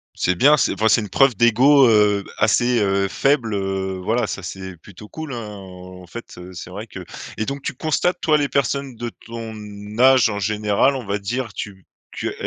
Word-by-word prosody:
C'est 90 Hz, -, 0 dB
bien, 145 Hz, +10 st, +5 dB
c'est -, -, +1 dB
enfin, 110 Hz, -, +1 dB
c'est 110 Hz, +2 st, +4 dB
une 105 Hz, -, -6 dB
preuve 135 Hz, -4 st, +3 dB
d'ego, 125 Hz, +5 st, +5 dB
heu, 105 Hz, -2 st, +3 dB
assez, 120 Hz, +2 st, +2 dB
heu, 100 Hz, -1 st, +1 dB
faible, 125 Hz, 0 st, +1 dB
heu, 95 Hz, -1 st, -2 dB
voilà 115 Hz, +4 st, +1 dB
ça, 100 Hz, -, -5 dB
c'est 95 Hz, 0 st, -7 dB
plutôt 100 Hz, +5 st, -14 dB
cool 155 Hz, +2 st, -7 dB
hein 115 Hz, -3 st, -5 dB
en 90 Hz, -2 st, -11 dB
fait, 115 Hz, +7 st, -10 dB
heu, 90 Hz, +1 st, -10 dB
c'est 85 Hz, 0 st, -8 dB
vrai 105 Hz, +4 st, -7 dB
que 95 Hz, -3 st, -9 dB, 0.3 s
et 110 Hz, -, -1 dB
donc 140 Hz, 0 st, -4 dB
tu -, -, -4 dB
constates 155 Hz, +6 st, 0 dB
toi 155 Hz, -2 st, +3 dB
les 145 Hz, -1 st, 0 dB
personnes 140 Hz, -1 st, -1 dB
de 120 Hz, +1 st, -5 dB, 0.2 s
ton 115 Hz, -1 st, -7 dB, 0.5 s
âge 130 Hz, -3 st, +6 dB
en 100 Hz, -1 st, -3 dB
général 105 Hz, +6 st, +1 dB
on 125 Hz, -, -5 dB
va 100 Hz, +1 st, -2 dB
dire 115 Hz, +2 st, -4 dB
tu 95 Hz, -3 st, -8 dB, 0.3 s
tu, -, -, -4 dB
heu, -, -, -6 dB
110 Hz, 205 wpm, -21 LUFS, 95-130 Hz, 0.5 s, âge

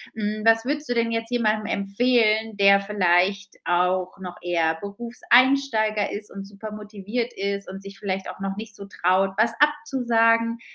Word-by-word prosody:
Hm, 215 Hz, 0 st, -3 dB
was 225 Hz, 0 st, +5 dB
würdest 295 Hz, +3 st, -2 dB
du 245 Hz, -, 0 dB
denn 230 Hz, -1 st, 0 dB
jetzt 225 Hz, 0 st, -2 dB
jemandem 215 Hz, -3 st, 0 dB
empfehlen, 220 Hz, +1 st, +1 dB
der 200 Hz, 0 st, +6 dB
vielleicht 195 Hz, 0 st, +1 dB
auch 180 Hz, +1 st, 0 dB
noch 180 Hz, -2 st, -8 dB
eher 165 Hz, -2 st, 0 dB
Berufseinsteiger 235 Hz, 0 st, +1 dB
ist 210 Hz, 0 st, -5 dB
und 195 Hz, 0 st, -8 dB
supermotiviert 210 Hz, +3 st, -6 dB
ist 200 Hz, 0 st, -3 dB
und 195 Hz, +1 st, -8 dB
sich 195 Hz, 0 st, -10 dB
vielleicht 190 Hz, -1 st, -3 dB
auch -, -, -9 dB
noch 195 Hz, 0 st, -3 dB
nicht 215 Hz, 0 st, -7 dB
so 200 Hz, -, -9 dB
traut, 190 Hz, 0 st, +1 dB
was 225 Hz, +2 st, +3 dB
abzusagen 235 Hz, -6 st, +2 dB
210 Hz, 155 wpm, -23 LUFS, 195-230 Hz, -, der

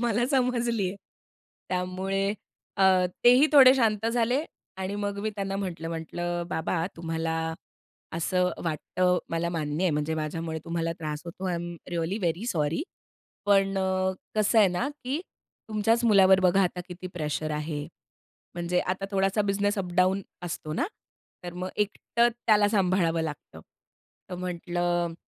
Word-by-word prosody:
मला 240 Hz, 0 st, +1 dB
समजली 240 Hz, -6 st, +1 dB
आहे. 190 Hz, -, -6 dB, 0.7 s
त्यामुळे 190 Hz, +2 st, -1 dB, 0.4 s
अ, 190 Hz, -2 st, +5 dB, 0.2 s
तेही 250 Hz, +4 st, +7 dB
थोडे 270 Hz, -3 st, +9 dB
शांत 220 Hz, -4 st, +1 dB
झाले 245 Hz, +5 st, +1 dB, 0.3 s
आणि 190 Hz, +1 st, -3 dB
मग 205 Hz, -1 st, -3 dB
मी 215 Hz, +1 st, -1 dB
त्यांना 195 Hz, 0 st, -2 dB
म्हटलं, 175 Hz, -4 st, -4 dB
म्हटलं, 175 Hz, +1 st, -3 dB
"बाबा 165 Hz, +1 st, -1 dB
तुम्हाला 165 Hz, -1 st, -2 dB, 0.8 s
असं 180 Hz, +2 st, +1 dB
वाटतं, 180 Hz, +3 st, +1 dB
मला 165 Hz, +1 st, 0 dB
मान्य 160 Hz, +1 st, -2 dB
आहे 180 Hz, -, +3 dB
म्हणजे 150 Hz, +2 st, -1 dB
माझ्यामुळे 160 Hz, +1 st, -3 dB
तुम्हाला 165 Hz, -1 st, -1 dB
त्रास 150 Hz, -1 st, -4 dB
होतो, 175 Hz, +2 st, -8 dB
I 175 Hz, -, 0 dB
am 175 Hz, 0 st, -4 dB, 0.2 s
really 175 Hz, +4 st, -1 dB
very 175 Hz, +6 st, -1 dB
sorry. 160 Hz, -, 0 dB, 0.6 s
पण 195 Hz, -1 st, +3 dB
अ, 190 Hz, 0 st, +1 dB, 0.2 s
कसं 215 Hz, +2 st, +3 dB
आहे 205 Hz, -3 st, +7 dB
ना, 180 Hz, +10 st, -1 dB, 0.2 s
की 275 Hz, +5 st, -1 dB, 0.5 s
तुमच्याच 225 Hz, +2 st, +2 dB
मुलावर 195 Hz, -3 st, +6 dB
बघा 190 Hz, +1 st, +4 dB
आता 180 Hz, 0 st, -1 dB
किती 180 Hz, +1 st, -7 dB
प्रेशर 155 Hz, -1 st, -2 dB
आहे 150 Hz, 0 st, -3 dB, 0.7 s
म्हणजे 175 Hz, +1 st, 0 dB
आता 185 Hz, +2 st, -2 dB
थोडासा 195 Hz, +1 st, +2 dB
बिझनेस 205 Hz, +1 st, 0 dB
अपडाउन 185 Hz, +1 st, +1 dB, 0.2 s
असतो 155 Hz, -2 st, -5 dB
ना. 250 Hz, -, 0 dB, 0.6 s
तर 175 Hz, -, -5 dB
मग 180 Hz, +1 st, -4 dB
एकटं 215 Hz, +3 st, +1 dB, 0.2 s
त्याला 210 Hz, -2 st, +5 dB
सांभाळावं 180 Hz, -5 st, +2 dB
लागतं. 150 Hz, -, -7 dB, 0.7 s
"तर -, -, -3 dB
म्हंटलं, 175 Hz, -1 st, -1 dB
185 Hz, 140 wpm, -27 LUFS, 170-205 Hz, 0.8 s, थोडे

